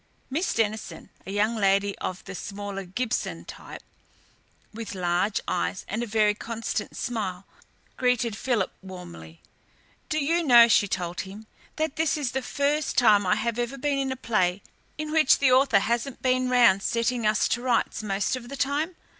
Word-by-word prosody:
Miss 325 +7 0
Denison, 220 -1 -2 0.2
a - - -4
young 210 +3 +1
lady 200 -1 +2
of 185 0 -5
the 195 - -7
smaller 200 0 -6
Gibson 225 +6 -3
type, - - -10 0.9
with 225 -2 -6
large 180 +3 0
eyes 85 +2 -2
and 215 +4 -3
a 240 - -3
very 210 -1 +3
constant 225 -1 -4
smile, 195 -6 -3 0.5
greeted 245 -3 +1
Philip 225 -4 -1
warmly. 85 - -11 0.7
"Do 310 - 0
you 325 +4 +1
know," 240 -5 +8
she 210 -2 +4
told 175 -2 -3
him, 200 +3 -10 0.3
"that 315 -2 -2
this 320 -1 +1
is 275 -5 -2
the 265 - -2
first 285 +3 -1
time 210 -5 +5
I - - +4
have 235 0 -2
ever 240 +3 -2
been 280 +1 0
in 270 -1 -1
a - - -2
play 200 -6 0 0.3
in 305 0 -4
which 310 -3 +5
the 270 -2 +3
author 255 -4 +5
hasn't 235 +4 -2
been 255 0 +2
round 235 -6 +5
setting 235 +1 0
us 215 0 +2
to 240 - 0
rights 250 -2 0
most 200 +2 -1
of 240 -1 -8
the 275 - -6
time? 290 +6 -1
230 Hz, 170 wpm, -26 LUFS, 200-260 Hz, 0.9 s, know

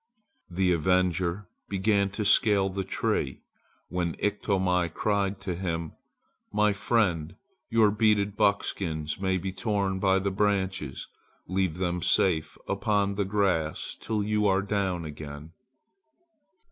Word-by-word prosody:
The 90 +1 +1
avenger 90 +2 +1 0.2
began 100 0 +2
to 105 - -1
scale 100 -2 +4
the 95 +1 -3
tree, 95 - -2 0.4
when 85 -2 -2
Iktomi 95 -4 0
cried 100 +1 0
to 95 -2 -3
him: 85 -3 -3 0.6
"My 105 0 +3
friend, 95 -7 0 0.3
your 110 -3 +4
beaded 105 -1 +2
buckskins 80 -7 0
may 95 -1 +1
be 95 +1 -3
torn 100 -1 -1
by 95 0 +3
the 100 +1 -1
branches. 95 -7 -1 0.4
Leave 95 -2 0
them 90 -1 -1
safe 80 -2 +2
upon 100 0 +1
the 100 0 -1
grass 95 -6 0
till 105 -2 -2
you 105 0 +1
are 95 0 +2
down 95 -4 -1
again." 75 0 -8
95 Hz, 120 wpm, -27 LUFS, 90-100 Hz, 0.6 s, scale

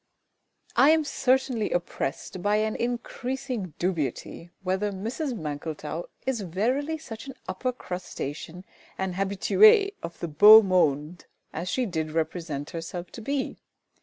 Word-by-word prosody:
I 275 - +6
am 320 0 +5
certainly 260 -5 +1
oppressed 175 0 -3
by 205 +3 +2
an 215 0 0
increasing 245 - -3
dubiety 170 -1 -3
whether 190 +2 0
Mrs 235 - -3
MANKLETOW 155 +1 -5 0.2
is 260 -4 -1
verily 250 - -1
such 235 -5 -9
an 270 - -8
upper 190 +7 -2
crustacean 180 - -6 0.3
and 190 -1 -2
habituée 395 - +5
of 170 - -7
the 170 - -3
beau 210 +8 +9
monde 170 -3 +1 0.3
as 175 +3 -4
she 255 +6 0
did 160 -6 -3
represent 160 -2 -3
herself 170 +1 -6
to 230 - -9
be. 275 +4 -2
190 Hz, 130 wpm, -26 LUFS, 170-250 Hz, 0.3 s, beau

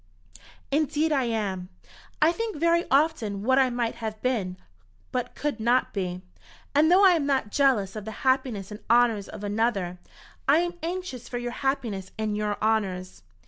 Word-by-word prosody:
"Indeed 305 +2 +1
I 270 -4 +2
am. 200 -6 -2 0.5
I 320 - +6
think 450 +3 -3
very 335 +2 +2
often 265 -9 +1
what 260 +3 +4
I 260 -1 +4
might 240 -2 -1
have 215 -1 -4
been, 205 -8 -1 0.5
but 250 -1 -3
could 290 -6 -2
not 240 +3 +2
be; 185 -2 -3 0.5
and 305 +3 +4
though 385 +2 +7
I 380 - +8
am 320 -5 +1
not 265 -7 0
jealous 235 -9 +2
of 210 -2 -6
the - - -5 0.2
happiness 255 -7 +1
and 210 - -7
honours 230 -4 +3
of - - -9
another, 205 -4 -1 0.5
I 280 +3 +6
am 345 +1 -1
anxious 330 -8 -5
for 245 - -3
your 240 0 -3
happiness 240 -9 -2
and 215 -1 -1
your 210 -1 -1
honours." 195 -4 -1
240 Hz, 170 wpm, -26 LUFS, 210-285 Hz, 0.5 s, I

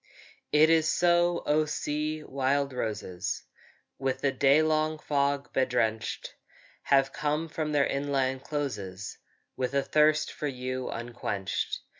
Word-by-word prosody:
It 155 +2 +6
is 160 -1 +4
so, 175 0 +3
O 155 +1 +3
sea! 150 +1 -2
wild 140 0 0
roses, 105 -7 -3 0.6
With 135 -1 -1
the 140 - +2
day 140 +3 +4
long 155 0 +1
fog 140 -2 -1
bedrenched, 120 -4 0 0.5
Have 135 -1 +3
come 150 +2 -1
from 155 -1 -3
their 145 -2 +3
inland 135 -2 -1
closes 100 -11 -4 0.4
With 130 +1 -2
a 140 - +3
thirst 150 +1 +3
for 150 - -3
you 130 -1 -3
unquenched. 105 -4 -3
140 Hz, 125 wpm, -28 LUFS, 130-150 Hz, 0.6 s, It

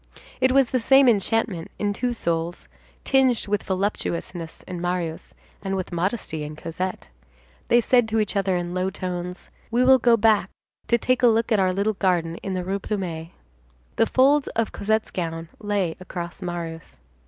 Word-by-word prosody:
It 260 0 +4
was 270 -1 +3
the 255 - +2
same 270 +3 +5
enchantment 205 -5 +1
in 205 -1 0
two 245 +4 -1
souls, 170 -6 -2 0.4
tinged 265 -3 +3
with 205 0 0
voluptuousness 185 -3 -3
in 180 -2 -6
Marius, 175 -2 -3 0.3
and 195 -1 -2
with 185 -1 -4
modesty 175 -3 -2
in 150 +1 -6
Cosette. 175 +4 -5 0.6
They 240 +1 +5
said 240 0 +3
to 220 0 +1
each 210 -1 -1
other 195 -2 +1
in 175 0 -3
low 185 +1 0
tones: 180 -1 -5 0.2
"We 240 +2 +2
will 260 0 +7
go 235 -1 +4
back 215 -3 +3 0.4
to 235 - +4
take 255 +1 +1
a 245 - +6
look 230 +1 +2
at 215 - +4
our 185 -1 +3
little 200 +3 0
garden 175 -4 0
in 190 -1 -4
the 180 - -2
Rue 195 +2 -2
Plumet." 175 -6 -4 0.7
The 225 - +4
folds 275 +2 +4
of 230 -1 0
Cosette's 220 +2 -1
gown 165 -2 -4
lay 205 -5 -1
across 175 0 -7
Marius. 165 - -6
195 Hz, 175 wpm, -24 LUFS, 175-225 Hz, 0.7 s, will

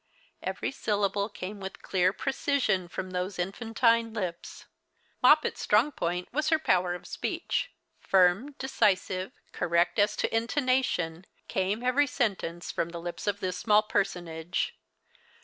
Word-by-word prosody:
Every - - -3
syllalile 205 0 0
came 200 +1 -7
A\ith 190 0 -7
clear 185 -1 +2
precision 255 -7 0
from 185 +2 -5
those 180 +1 -3
infantine 225 +4 +1
lips. 180 -5 -5 0.6
3Ioppet's 300 +4 +5
strong 225 +8 +3
point 180 -7 -2
was 305 +2 +1
her 320 - +4
po\\er 180 - +1
of 180 - -10
speech. - - -2 0.3
Fu 195 - +1
m, 190 +11 +3
decisive, 195 -8 +1 0.2
correct 170 +4 +1
as 210 +1 +3
to - - -1
intonation, 230 - 0 0.2
came 195 +5 -1
every 265 +3 +3
sentence 190 -9 -2
from 165 - -1
the 170 0 -6
lips 175 +4 -6
of 205 0 0
this 185 -1 -2
small 210 -1 +4
personage. 180 -5 -2
200 Hz, 135 wpm, -28 LUFS, 180-230 Hz, 0.6 s, 3Ioppet's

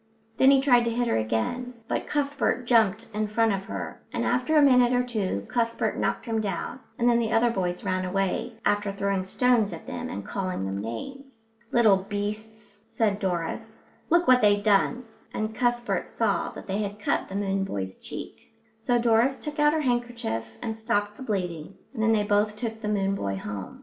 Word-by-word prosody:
Then 265 - +6
he 275 -1 +6
tried 245 -3 +5
to - - +1
hit 240 +1 0
her - - +1
again, 115 - -2
but - - -2
Cuthbert 285 -3 0
jumped 225 -2 +3
in 215 0 -1
front 225 0 +2
of 195 0 -3
her, - - -6
and - - -2
after 250 +6 +2
a - - +7
minute 250 -3 +5
or 250 0 +3
two 205 - -2
Cuthbert 230 -1 0
knocked - - -1
him 225 -2 -1
down; 200 +4 -3 0.2
and 240 - +2
then 235 -1 +4
the 225 -1 -1
other 235 +1 +3
boys 180 -4 -2
ran 185 -2 -1
away, 195 +5 -1
after 205 0 +1
throwing 195 -1 -1
stones 225 +1 +2
at 165 - -9
them - - -5
and 100 0 -6
calling 185 - -3
them 95 +1 -3
names. 225 - -8 0.2
"Little 220 -5 +5
beasts," 210 +2 -6
said 210 -3 0
Doris, 175 -4 -3 0.3
"look 345 +1 +3
what 255 0 +6
they've 205 -1 +4
done," 220 +4 +2 0.3
and 215 0 -2
Cuthbert 240 +1 0
saw - - 0
that - - -9
they 195 +1 -2
had 205 -1 -3
cut 210 - -1
the 190 - -6
moon 195 -1 0
boy's 95 - -4
cheek. - - -9 0.2
So 225 +2 +1
Doris 235 +3 +3
took 300 0 -6
out 295 0 +5
her 315 - +1
handkerchief 240 - -1 0.2
and 225 - -3
stopped 205 -2 -1
the - - -13
bleeding, 180 -7 -3 0.2
and 225 - -4
then 225 0 +3
they 215 -2 +3
both 205 0 +1
took 225 -1 -5
the 210 - -3
moon 195 -2 +1
boy 100 - -2
home. 100 -1 -6
215 Hz, 195 wpm, -26 LUFS, 195-240 Hz, 0.3 s, a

